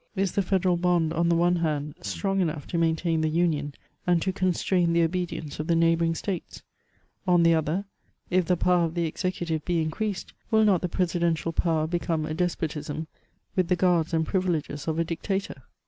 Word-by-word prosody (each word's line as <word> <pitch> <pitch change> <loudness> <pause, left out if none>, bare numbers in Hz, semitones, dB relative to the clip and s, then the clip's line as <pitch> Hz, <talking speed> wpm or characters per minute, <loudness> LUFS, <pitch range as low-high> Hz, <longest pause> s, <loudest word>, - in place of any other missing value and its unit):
Is 195 -1 0
the 200 - +1
federal 185 -1 +1
bond, 170 -2 +2
on 170 +1 +1
the 170 - +3
one 175 +1 +3
hand, 150 -3 -1
strong 195 - -1
enough 155 -5 -2
to 170 - -3
maintain 165 0 +1
the 155 - +1
union, 155 -3 0 0.3
and 175 -1 +4
to 190 - -1
constrain 180 -2 +1
the 170 0 +4
obedience 165 -3 -3
of 155 - -3
the 170 - +3
neighbouring 165 0 +3
states? 185 +1 -5 0.6
On 175 -1 +5
the 165 0 +5
other, 160 +5 0 0.5
if 185 0 +3
the 180 +1 +2
power 180 0 +3
of 165 +1 -5
the 170 -1 +1
executive 165 -2 -2
be 175 0 0
increased, 180 +5 -3 0.2
will 220 -1 +4
not 195 -5 +3
the 180 - -2
pre 180 +2 +1
sidential 170 -2 -1
power 160 -3 +1
become 165 -1 -1
a 155 - -3
despotism, 160 -3 -2 0.5
with 185 -2 +2
the 180 - +3
guards 175 -2 +2
and 160 -1 +1
privi 185 +1 0
leges 150 -3 -3
of 160 0 -1
a 165 - +2
dictator 170 -1 -3
170 Hz, 195 wpm, -26 LUFS, 160-180 Hz, 0.6 s, On